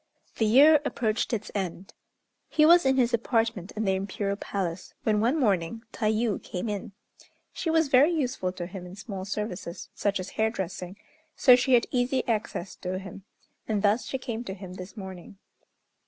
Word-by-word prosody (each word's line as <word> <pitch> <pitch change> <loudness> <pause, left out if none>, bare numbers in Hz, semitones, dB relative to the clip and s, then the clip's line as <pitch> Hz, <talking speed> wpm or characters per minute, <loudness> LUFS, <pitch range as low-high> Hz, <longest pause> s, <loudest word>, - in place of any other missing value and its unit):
The 220 - +2
year 285 +6 +7
approached 225 -4 -1
its 215 -3 -3
end! 190 -1 -4 0.6
He 305 - +4
was 340 -2 +7
in 265 0 +3
his 245 -1 +2
apartment 225 -4 0
in 220 0 -1
the 190 - +2
Imperial 195 +1 -2
Palace, 185 -4 -4
when 215 -1 +2
one 250 +8 +2
morning 210 - 0
Tayû 215 -1 0
came 180 +5 -5
in. 205 -2 -4 0.6
She 330 - -3
was 320 -1 +3
very 275 +3 +6
useful 255 - -1
to 180 -1 -5
him 180 0 -8
in 180 - -10
small 195 -2 -6
services, 190 -4 -5
such 200 -1 0
as 185 - -6
hairdressing, 190 -4 -2 0.4
so 250 -3 +7
she 250 +1 +3
had 235 - +3
easy 250 +1 0
access 210 -5 -2
to 185 0 -3
him, 195 0 -9 0.4
and 210 -2 0
thus 210 +4 +2
she 265 - -2
came 240 -2 -5
to 190 - -5
him 190 -2 -9
this 185 +4 -9
morning. 190 -1 -9
210 Hz, 175 wpm, -27 LUFS, 190-245 Hz, 0.6 s, year